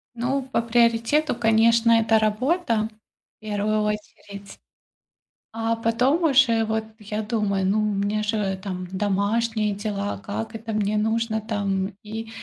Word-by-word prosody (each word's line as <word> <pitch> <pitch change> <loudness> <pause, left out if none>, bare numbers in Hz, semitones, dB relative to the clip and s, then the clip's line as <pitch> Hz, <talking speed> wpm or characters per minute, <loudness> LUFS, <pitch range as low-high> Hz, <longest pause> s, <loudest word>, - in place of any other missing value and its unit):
Ну, 255 +4 -1
по 260 -2 -1
приоритету, 235 +5 +2
конечно, 230 0 +4
это 225 -1 +4
работа 225 +2 0 0.5
в - - -77
первую 215 0 -1
очередь. 205 -1 -6 1.0
А 225 0 -1
потом 230 +8 +1
уже, 255 -7 +4
вот, 220 0 -1 0.2
я 210 0 -4
думаю, 210 -3 0
ну, 200 +3 +2
у 215 -1 0
меня 205 +2 0
же 205 -3 -1
там 185 -2 -5
домашние 210 +3 0
дела. 200 - -3
Как 105 +2 -5
это, 225 0 -5
мне 210 0 0
нужно 220 +1 0
там 200 -2 -2
и 220 +1 -6
220 Hz, 135 wpm, -24 LUFS, 205-230 Hz, 1.0 s, конечно